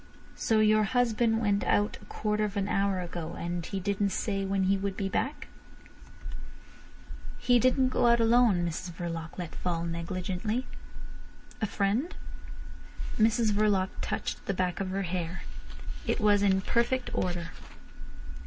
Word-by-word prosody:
"So 220 -1 +2
your 215 0 +5
husband 230 0 +2
went 205 -2 +2
out 205 0 +1
a - - -14
quarter 215 0 -1
of 205 -1 -2
an 200 0 0
hour 195 -2 +1
ago! 170 -1 -5
And 175 0 -3
he 195 +3 -4
didn't 200 +1 0
say 195 +1 -1
when 195 0 0
he 190 +1 +3
would 195 0 -3
be 195 - -1
back?" 270 +8 -2 1.9
"He 245 0 +4
didn't 255 +1 +3
go 245 - +2
out 235 0 +5
alone," 225 -6 +4
Mrs 170 +2 -5
Verloc 165 -1 -5
let 175 -3 -5
fall 170 -2 -2
negligently. 185 +7 -2 1.0
"A 215 - +1
friend?" 215 - 0 1.0
Mrs 225 0 +3
Verloc 205 -2 +2
touched - - -3
the 195 - 0
back 180 -2 -1
of 195 -1 -2
her 195 +1 -1
hair. 175 0 -3 0.6
It - - +1
was 205 -2 +4
in 190 -1 +3
perfect 240 +5 0
order. 175 -2 -1
200 Hz, 145 wpm, -29 LUFS, 180-220 Hz, 1.9 s, your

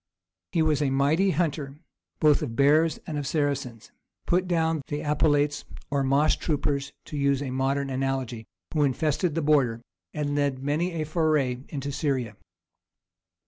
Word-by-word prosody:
He 165 -3 +2
was 155 -2 +1
a 145 - +2
mighty 145 +8 +2
hunter, 150 -4 -1 0.4
both 150 -2 +4
of 125 -7 -4
bears 150 +5 +4
and 150 -2 -3
of 140 - -4
Saracens, 140 -6 -2 0.3
put 180 +1 +1
down 160 -3 +1
the 145 0 -3
Apelates 145 -1 +1 0.3
(or 140 -1 +1
moss 140 +3 +3
troopers, 140 -2 -1
to - - -8
use 140 -1 +2
a 135 - -4
modern 135 +1 0
analogy) 130 -4 -2 0.3
who 155 - +1
infested 150 +4 0
the 165 - 0
border, 135 -6 +3 0.3
and 145 -1 -2
led 145 -2 +1
many 160 +5 0
a 160 -2 -2
foray 155 -5 +1
into 140 -1 -4
Syria. 130 -7 -1
145 Hz, 150 wpm, -26 LUFS, 135-155 Hz, 0.4 s, both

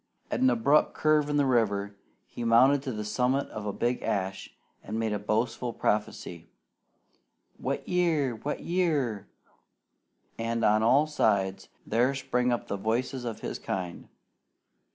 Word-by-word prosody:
At - - -1
an 260 +1 +5
abrupt 150 - +3
curve 155 -1 +2
in 145 - +1
the 145 - +3
river 100 -5 +1 0.3
he 120 - -7
mounted 130 +5 +5
to 135 -2 -4
the 105 -2 -4
summit 125 +5 0
of 105 -1 -6
a - - 0
big 120 +4 -1
ash 95 -1 -2 0.3
and 110 - -4
made 110 -2 0
boastful 115 +2 0
prophecy, 90 -6 -2 1.1
"Wet - - -3
year! 160 -8 +1
Wet 145 +6 -4
year!" 145 - 0 1.1
and 115 0 0
on 105 +1 +4
all 130 +7 +4
sides 100 -10 0 0.2
there 125 +5 +2
sprang 125 -2 0
up 120 - -2
the 100 - -3
voices 120 +5 -2
of 115 -2 -5
his - - -4
kind. 90 -2 -5
120 Hz, 145 wpm, -28 LUFS, 105-140 Hz, 1.1 s, an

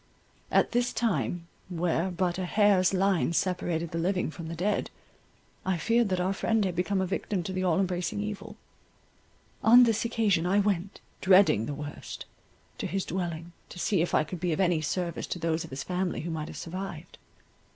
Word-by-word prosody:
At - - +3
this 245 0 +1
time 190 -6 -1 0.2
where 175 0 0
but 180 0 -1
a 185 - -1
hair's 200 -1 +4
line 190 -3 +2
separated 170 -2 -1
the 165 - -2
living 180 -1 0
from 165 0 -8
the 165 - -5
dead, 195 +5 0 0.7
I 190 -2 0
feared 230 +5 +2
that 185 -1 0
our 185 +2 +1
friend 220 +1 +1
had 180 -2 -2
become 190 +2 0
a - - +1
victim 190 0 -2
to 185 - -4
the 185 0 -1
all 180 -1 +2
embracing 180 0 -1
evil. 210 +1 -5 1.1
On 240 +3 +8
this 225 -2 +2
occasion 210 -7 +1
I 195 +3 +3
went, 200 -2 0 0.2
dreading 185 - +5
the 145 - -3
worst, 145 0 -7 0.5
to - - -2
his 195 0 -2
dwelling, 170 -1 -4 0.2
to - - -10
see 180 0 +1
if 170 - 0
I - - +4
could 170 +3 -7
be 175 0 0
of 155 - -1
any 175 -4 +2
service 170 +2 -2
to - - -3
those 165 -1 -1
of - - -9
his 135 +1 -5
family 180 0 -2
who 165 +2 -4
might 155 -1 -3
have - - -8
survived. 175 -1 -7
180 Hz, 195 wpm, -28 LUFS, 170-195 Hz, 1.1 s, On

